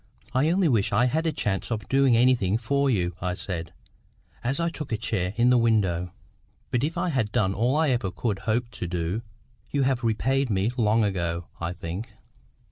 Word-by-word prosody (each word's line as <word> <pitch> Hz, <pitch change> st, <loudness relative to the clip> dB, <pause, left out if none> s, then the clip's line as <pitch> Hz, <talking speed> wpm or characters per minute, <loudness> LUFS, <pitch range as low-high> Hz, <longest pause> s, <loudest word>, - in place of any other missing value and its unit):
"I 135 Hz, +5 st, +3 dB
only 180 Hz, +1 st, +3 dB
wish 110 Hz, -6 st, +2 dB
I 105 Hz, +5 st, +3 dB
had 160 Hz, +6 st, 0 dB
a -, -, +2 dB
chance 100 Hz, -9 st, -2 dB
of 110 Hz, -4 st, -3 dB
doing 135 Hz, -3 st, +4 dB
anything 120 Hz, -5 st, +3 dB
for 140 Hz, +4 st, +1 dB
you," 90 Hz, -7 st, +1 dB
I 90 Hz, 0 st, -1 dB
said, 85 Hz, -3 st, -5 dB, 0.7 s
as 135 Hz, +6 st, 0 dB
I 170 Hz, 0 st, +1 dB
took 150 Hz, -5 st, -6 dB
a 110 Hz, -, +1 dB
chair 105 Hz, -4 st, -2 dB
in 120 Hz, +1 st, +4 dB
the 125 Hz, -, +5 dB
window. 95 Hz, -7 st, +1 dB, 0.6 s
"But 125 Hz, +1 st, +1 dB
if 160 Hz, +4 st, -1 dB
I 175 Hz, +1 st, 0 dB
had 120 Hz, -9 st, 0 dB
done 95 Hz, -2 st, +1 dB
all 120 Hz, +7 st, +1 dB
I 155 Hz, -2 st, +3 dB
ever 120 Hz, -6 st, 0 dB
could 100 Hz, +2 st, -2 dB
hope 120 Hz, +2 st, 0 dB
to 90 Hz, -3 st, -5 dB
do, 90 Hz, +4 st, -2 dB, 0.5 s
you 140 Hz, -1 st, +1 dB
have 130 Hz, -2 st, +1 dB
repaid 130 Hz, +4 st, +1 dB
me 100 Hz, +2 st, +1 dB
long 110 Hz, -2 st, +3 dB
ago, 85 Hz, -4 st, -1 dB
I 85 Hz, +1 st, -3 dB
think." 90 Hz, +5 st, -6 dB
115 Hz, 200 wpm, -26 LUFS, 95-130 Hz, 0.7 s, the